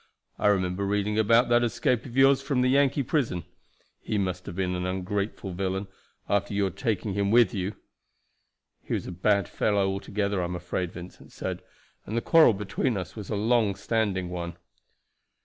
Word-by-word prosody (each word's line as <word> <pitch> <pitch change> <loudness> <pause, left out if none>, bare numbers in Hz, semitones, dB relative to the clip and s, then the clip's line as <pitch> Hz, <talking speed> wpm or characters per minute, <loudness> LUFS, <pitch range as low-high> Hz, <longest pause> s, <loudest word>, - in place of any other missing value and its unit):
I - - +2
remember 95 -1 +1
reading 105 +1 0
about 115 +3 +4
that 120 0 +4
escape 120 +1 0
of 125 +1 -8
yours 135 0 +6
from 135 -2 0
the 125 - +3
Yankee 140 0 +3
prison. 115 - -1 0.6
He 110 - -2
must 90 -2 -2
have - - -6
been 90 -1 -1
an 90 0 -2
ungrateful 95 +1 -3
villain, 95 +2 -2 0.4
after 100 0 0
your 100 -2 +1
taking 100 +1 -2
him 100 0 0
with 115 -2 +5
you." 95 +1 -3 1.1
"He - - -2
was - - -3
a - - -6
bad 100 +2 +1
fellow 100 -2 +1
altogether, 100 0 -1
I - - -1
am 90 +1 -4
afraid," 90 0 -3
Vincent 90 0 -11
said; - - -5 0.5
"and 110 - -2
the - - +1
quarrel 160 -6 +6
between 105 +4 -1
us 95 - -6
was 105 -3 -8
a 110 - -1
long 110 -1 +2
standing 100 -6 -1
one." 85 -1 -5
100 Hz, 180 wpm, -27 LUFS, 95-115 Hz, 1.1 s, yours